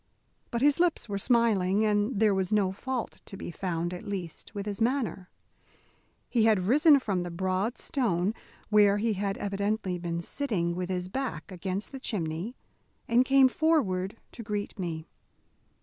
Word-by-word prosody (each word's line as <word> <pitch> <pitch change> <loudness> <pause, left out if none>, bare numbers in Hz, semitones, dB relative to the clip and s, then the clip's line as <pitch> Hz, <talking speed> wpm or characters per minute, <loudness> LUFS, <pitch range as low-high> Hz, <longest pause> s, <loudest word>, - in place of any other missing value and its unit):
But 235 +2 -1
his 290 +2 +4
lips 345 -7 +1
were 200 -2 -2
smiling, 215 -4 +3
and 210 +1 +1
there 215 -2 +4
was 190 0 -1
no 205 -3 +3
fault 245 +4 -4
to 195 - -9
be - - -6
found, 175 -1 -2
at 180 - -7
least, 195 -2 -6
with 200 -1 -3
his 205 0 -4
manner. 225 - 0 1.0
He 230 -3 +2
had 210 -5 +3
risen 290 - +6
from 200 -8 -1
the 175 - -4
broad 185 +6 -1
stone 210 - 0 0.4
where 205 -1 +5
he 220 +1 +1
had 200 0 -2
evidently 200 -2 -1
been 170 0 -3
sitting 190 -10 -1
with 180 0 -3
his 180 -1 -2
back 200 - -4
against 190 +2 -4
the 270 - -7
chimney, 185 -1 -3 0.5
and 235 +2 +4
came 270 0 +6
forward 230 - +1
to - - -9
greet 210 -1 -4
me. 165 -3 -3
205 Hz, 165 wpm, -28 LUFS, 185-235 Hz, 1.0 s, risen